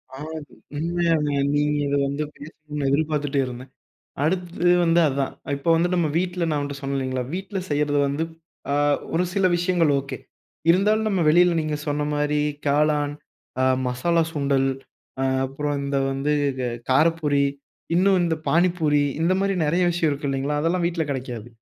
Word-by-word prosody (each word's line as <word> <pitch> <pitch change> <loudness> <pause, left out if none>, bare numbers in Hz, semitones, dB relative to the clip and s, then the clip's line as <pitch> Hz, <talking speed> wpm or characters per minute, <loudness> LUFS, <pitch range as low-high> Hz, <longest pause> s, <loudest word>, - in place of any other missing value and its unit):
ஆ, - - -9 0.6
உண்மையாங்க. 165 -1 +1 0.2
நீங்க 150 0 +1
இத 140 - 0
வந்து 140 +2 -2
பேசணுன்னு 150 -1 -6
எதிர்பார்த்துட்டே 145 -1 0
இருந்தேன். 125 +1 -8 0.5
அடுத்தது 175 +1 0
வந்து 170 0 +3
அதான் 135 -1 -1 0.2
இப்போ 140 +4 -2
வந்துட்டு 175 +2 +1
நம்ம 165 -3 +1
வீட்ல 180 0 -1
நான் 150 -2 0
உன்ட்ட 145 0 -4
சொன்னேன் 140 -1 -3
இல்லேங்களா! 130 -1 -2
வீட்ல 195 +2 -4
செய்யிறது 145 0 +1
வந்து 140 +3 -1 0.5
அ - - +1 0.4
ஒரு 170 +2 +2
சில 195 -1 +2
விஷயங்கள் 175 -3 +2
ஓகே. 135 0 -6 0.5
இருந்தாலும் 210 +5 +3
நம்ம 190 -4 +1
வெளில 175 +3 +5
நீங்க 155 -1 -2
சொன்னமாரி 150 0 0 0.3
காளான், 145 0 +2 0.5
அ - - +3 0.2
மசாலா 165 +7 +1
சுண்டல் 140 -3 +1 0.5
அ - - +1 0.2
அப்புறம் 145 +2 -3
இந்த 140 0 -1
வந்து 135 +2 -1 0.3
க - - -1 0.3
காரப்பூரி 150 0 +3 0.5
இன்னும் 190 +1 +4
இந்த 165 -1 +1
பாணிபூரி 165 -4 +2 0.2
இந்தமாரி 190 +3 +2
நிறைய 170 +5 +2
விஷயம் 170 -2 +1
இருக்கு 140 +1 -3
இல்லேங்களா! 135 +2 -1
அதெல்லாம் 170 +3 0
வீட்ல 170 -2 -1
கெடைக்காது. 125 -4 -5
150 Hz, 145 wpm, -23 LUFS, 140-170 Hz, 0.6 s, வெளில